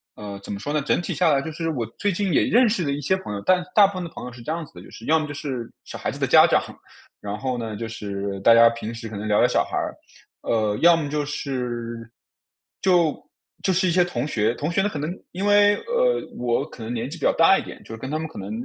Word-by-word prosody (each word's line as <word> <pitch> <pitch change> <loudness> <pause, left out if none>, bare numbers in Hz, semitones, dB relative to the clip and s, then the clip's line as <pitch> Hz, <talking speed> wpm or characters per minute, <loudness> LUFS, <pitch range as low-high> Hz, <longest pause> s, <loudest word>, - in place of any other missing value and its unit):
呃， 100 -2 -7
怎 - - -7
么 100 - -4
说 145 +7 -4
呢？ 150 - +1
整 140 - +1
体 175 - -3
下 175 -3 +3
来 140 - +3
就 160 - -5
是， 165 +1 -3
我 125 -7 -2
最 205 - +1
近 195 0 -1
也 - - +4
认 245 +1 +4
识 210 -4 0
了 140 - -1
一 140 - -2
些 145 +6 +1
朋 190 - -8
友， 100 - -5
但 185 -1 +3
大 210 - +8
部 200 - -1
分 185 -1 -4
的 170 - -6
朋 125 - -9
友 125 - -7
是 120 0 -12
这 135 - -4
样 165 0 -3
子 - - -20
的， 90 - -11
就 - - -14
是 115 - -11
要 160 +1 +4
么 155 - -3
就 145 - -6
是 130 -5 -5
小 - - -8
孩 - - -2
子 - - -6
的 - - +2
家 - - +7
长， - - +4 0.6
然 105 0 -4
后 130 +3 -2
呢， 110 -2 -4
就 115 +2 -5
是 100 -3 -5
大 115 +4 +6
家 115 0 +8
平 115 -1 -6
时 115 0 -7
可 110 - -8
能 105 +1 -4
聊 105 -1 +3
聊 - - +5
小 - - +2
孩 - - -4
儿。 - - -2 0.5
呃， 110 -2 0
要 170 0 +7
么 155 -3 -2
就 150 +1 -1
是 120 -5 -4 0.7
就 175 -5 +3 0.5
就 190 - +1
是 185 +1 +2
一 - - +2
些 180 +1 +4
同 145 -7 -3
学， 115 -3 0
同 150 +7 -2
学 185 - +2
呢， 205 - +1
可 - - -5
能 150 +3 -3 0.2
因 190 +3 -3
为， 205 0 +5
呃， 485 +1 +2 0.2
我 120 -1 0
可 115 - -11
能 110 - -5
年 120 0 -2
纪 165 - -7
比 - - -16
较 - - +4
大 165 +4 +5
一 - - -5
点， - - -9
就 - - -10
是 - - -6
跟 130 +4 -6
他 155 - -1
们 160 0 -4
可 160 - -10
能 100 +1 -6
145 Hz, 320 characters per minute, -23 LUFS, 115-175 Hz, 0.7 s, 大